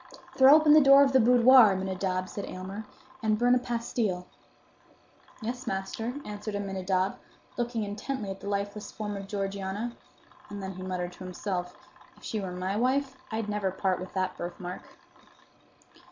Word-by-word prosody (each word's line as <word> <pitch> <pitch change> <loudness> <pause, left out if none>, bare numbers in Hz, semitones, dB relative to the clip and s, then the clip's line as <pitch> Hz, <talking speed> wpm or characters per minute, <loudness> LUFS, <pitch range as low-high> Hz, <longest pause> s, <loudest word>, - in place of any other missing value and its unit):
"Throw 270 +2 +8
open 310 -1 +6
the 310 - +8
door 275 0 +8
of 270 -1 +1
the 265 - +6
boudoir, 245 -2 +7
Aminadab," 185 -1 -2
said 200 - -6
Aylmer, 195 +4 -7 0.3
"and 215 -1 +2
burn 245 +2 +4
a 250 - +4
pastil." 230 -6 -2 1.2
"Yes, 250 +3 -4
master," 210 +5 -3
answered 210 0 -5
Aminadab, 190 -1 -1 0.4
looking 240 -2 -2
intently 210 +1 -4
at 195 - -7
the 200 - -6
lifeless 200 +1 -3
form 210 -1 -5
of 195 0 -7
Georgiana; 200 +3 -3 0.5
and 205 -1 -6
then 190 - -4
he 185 - -9
muttered 180 -1 -3
to 180 - -11
himself, 180 -1 -4 0.4
"If - - -20
she 220 - -3
were 190 -2 -4
my 185 +2 -3
wife, 260 +4 +1 0.2
I'd 220 -1 -2
never 210 -2 -1
part 190 0 -1
with 185 +1 -8
that 185 -1 -1
birthmark." 175 +1 -6
205 Hz, 160 wpm, -28 LUFS, 190-235 Hz, 1.2 s, Throw